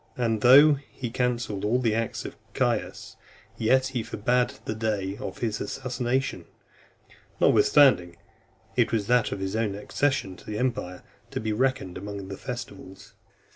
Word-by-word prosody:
And 115 -3 0
though 140 +4 +7
he 120 -3 -6
cancelled 120 -5 -1
all 110 +4 +2
the 120 -4 +1
acts 115 +1 -2
of - - -7 0.2
Caius, - - -2 0.4
yet 130 +4 +2
he 125 -3 -2
forbad 120 +4 0
the - - -2
day 105 -3 -2
of 95 - -6
his 110 -3 -2
assassination, 130 +1 -2 0.9
notwithstanding 105 -8 +5 0.6
it - - +2
was 110 -3 0
that 120 0 +2
of - - -4
his 95 +1 -3
own 110 -3 0
accession 105 -1 -1
to - - -16
the 105 - -4
empire, 110 -7 -2 0.3
to - - -4
be 110 0 -2
reckoned 125 -6 -1
amongst 100 -1 -7
the 95 - -6
festivals. 105 -6 -8
115 Hz, 150 wpm, -26 LUFS, 100-125 Hz, 0.9 s, though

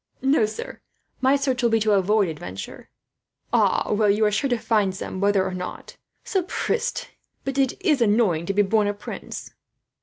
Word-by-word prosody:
"No, 265 -5 +3
sir, 215 - -7 0.4
my 265 +1 +4
search 270 -3 0
will 235 - +3
be 225 0 +3
to 215 0 +2
avoid 200 +1 +3
adventure." 95 - -7 0.6
"Ah, - - +2
well, 210 0 +3
you 210 +2 +3
are 210 - +2
sure 270 +6 0
to 245 - +1
find 210 -4 +1
some, 190 0 -5
whether 200 -1 +3
or 190 - -3
not. 180 0 -7 0.3
Sapristie, 390 +5 -2 0.4
but 270 0 -2
it 270 -1 +1
is 300 -8 +3
annoying 205 -7 +2
to 195 - 0
be 205 - +5
born 210 +1 +2
a 205 - -1
prince." 205 - -8
215 Hz, 180 wpm, -24 LUFS, 195-255 Hz, 0.6 s, be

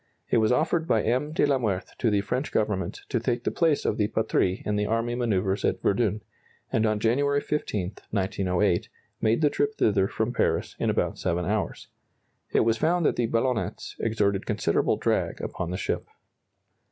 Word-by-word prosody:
It - - +4
was 110 0 +3
offered 160 +5 +1
by 110 -7 +2
M. 130 +6 0
de 155 - +2
la 140 -2 +2
Meurthe 100 -6 -2
to 120 - +2
the 100 -1 +2
French 125 +8 -2
Government 105 -3 -1
to 125 - +1
take 120 +1 -1
the - - 0
place 160 -4 +1
of - - +1
the 105 - +2
"Patrie" 100 -4 0
in 105 - 0
the 105 0 0
army 115 +2 0
manœuvres 100 -5 0
at - - +1
Verdun, 105 0 +1 0.5
and 110 0 +3
on 105 -1 0
January 140 +6 +2
15, 105 -11 -2 0.2
1908, 95 -2 0 0.3
made 110 +6 +2
the 150 -2 +4
trip 145 0 0
thither 100 -3 +2
from 110 +4 -2
Paris - - 0
in - - +1
about - - 0
7 90 -1 -1
hours. 105 +2 -2 0.6
It - - +3
was 115 0 +2
found 170 +1 +2
that - - +3
the 120 - +1
ballonnets 115 -4 -1
exerted 105 -3 0
considerable 105 -6 +1
drag - - 0
upon 85 - -4
the 90 - -3
ship. - - -2
110 Hz, 185 wpm, -26 LUFS, 100-125 Hz, 0.6 s, It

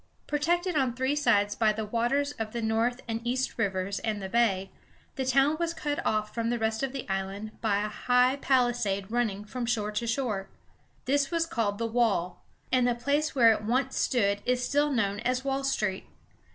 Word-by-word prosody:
Protected 345 +4 0
on 260 -4 +1
three 260 +3 0
sides 205 -8 +2
by 215 0 +3
the 215 0 -3
waters 240 +6 0
of 215 -1 -4
the 235 - -2
North 230 +3 0
and 225 0 -3
East 250 +1 -2
rivers 195 -1 -1
and 215 -2 -2
the 190 -1 -5
Bay, 195 -4 +1 0.4
the 265 -2 -2
town 275 +4 +3
was 335 0 -1
cut 295 -2 -2
off 215 -1 -1
from 230 -1 -1
the 240 - 0
rest 220 -1 -1
of 270 -1 -1
the 270 -1 -6
island 195 +2 -3
by 205 -2 +1
a - - -1
high 250 +4 +2
palisade 240 -7 +1
running 215 -4 -1
from 240 +2 -4
shore 210 -3 0
to 220 +3 -2
shore. 225 -6 -2 0.6
This 280 +1 +2
was 335 -1 +1
called 225 -11 -1
the 230 - -2
"Wall," 220 -7 0 0.3
and 255 -1 +3
the 245 - +1
place 290 +5 0
where 235 -4 +7
it 215 - -4
once 255 +4 0
stood 200 -5 +1
is 250 0 0
still 290 +1 +1
known 205 -5 0
as 255 +3 -1
Wall 275 0 -1
Street. 210 -8 -1
235 Hz, 195 wpm, -28 LUFS, 210-265 Hz, 0.6 s, where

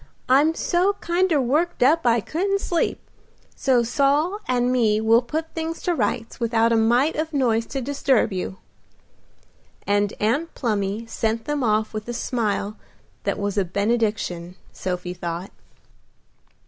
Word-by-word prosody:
I'm 290 +5 +4
so 360 +5 +1
kinder 345 -4 +1
worked 295 +5 +1
up 300 +2 +4
I 230 -1 +4
couldn't 390 - -1
sleep, 345 -3 -1 0.6
so 250 -3 +2
Saul 290 - +1
and 250 0 +1
me 220 -4 +2
will 225 +2 +4
put 315 +6 -4
things 325 0 -3
to 355 - +1
rights 240 -8 -2
without 230 -1 +2
a - - +4
mite 240 +7 +3
of 315 +1 -3
noise 230 -5 +1
to 270 - -4
disturb 265 -4 +1
you;" 190 +1 -4 1.3
and 205 0 +1
Aunt 280 +11 0
Plumy 210 -2 -1
sent 225 0 -2
them 295 -2 -1
off 215 -1 +1
with 215 0 -5
a - - -2
smile 215 -4 -2 0.5
that - - 0
was 205 0 -1
a - - +3
benediction, 200 -3 -1 0.2
Sophie 180 -1 -4
thought. 175 +1 -5
235 Hz, 145 wpm, -23 LUFS, 215-295 Hz, 1.3 s, I'm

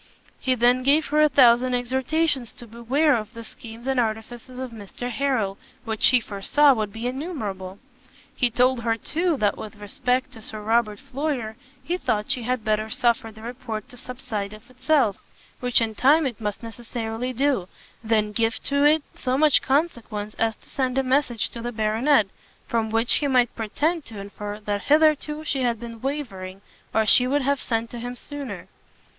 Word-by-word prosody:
He 260 -2 +1
then 245 +1 +4
gave 290 +4 +4
her 300 +1 +3
a 305 - +6
thousand 250 -2 +5
exhortations 260 +2 0
to 240 - -9
beware 250 +6 +2
of 215 -1 -5
the 230 - -7
schemes 230 +1 -10
and 265 -1 +1
artifices 235 +2 -3
of 260 -1 -5
Mr 230 +3 -7
Harrel, 235 -7 0 0.3
which 220 -1 +3
he 250 - +5
foresaw 235 +7 +3
would 215 -4 -2
be 225 +3 -6
innumerable. 220 - -4 0.6
He 245 - +2
told 250 +1 +2
her, 225 0 0
too, 335 +6 0
that 210 -4 +1
with 215 0 -7
respect 250 +5 -1
to 225 - -11
Sir 215 0 -6
Robert 220 -1 +1
Floyer, 260 -6 -3 0.3
he 350 +2 -1
thought 210 -8 -1
she 250 - 0
had 250 0 -1
better 215 0 0
suffer 230 0 +1
the 220 0 -14
report 235 -3 -6
to - - -12
subside 220 -5 -5
of 215 +4 -14
itself, 255 -4 +2 0.4
which 245 -1 +3
in 225 -1 0
time 285 +8 +4
it 235 -4 -3
must 210 +2 -3
necessarily 230 +1 -4
do, 260 -7 +1 0.4
than 215 -1 +1
give 225 +1 +1
to 280 0 +1
it 300 +1 +5
so 255 0 -1
much 300 0 +5
consequence 235 -8 -1
as 225 -1 +1
to - - -22
send 260 -1 -1
a 270 - +3
message 255 -5 +1
to 235 - -7
the 240 +1 -3
Baronet, 220 +3 +3 0.4
from 225 -1 0
which 225 +2 +2
he 290 - 0
might 250 -3 +2
pretend 300 +9 -1
to 225 - -10
infer 205 +1 -6
that 205 -1 -3
hitherto 305 0 +3
she 280 -3 -1
had 235 -3 0
been 230 -1 -8
wavering, 200 -10 -4 0.3
or 220 0 +2
she 250 +3 +5
would 285 +1 +1
have 280 0 +1
sent 230 -1 -2
to 240 - -6
him 245 +1 -5
sooner. 285 +2 -7
240 Hz, 185 wpm, -24 LUFS, 220-270 Hz, 0.6 s, a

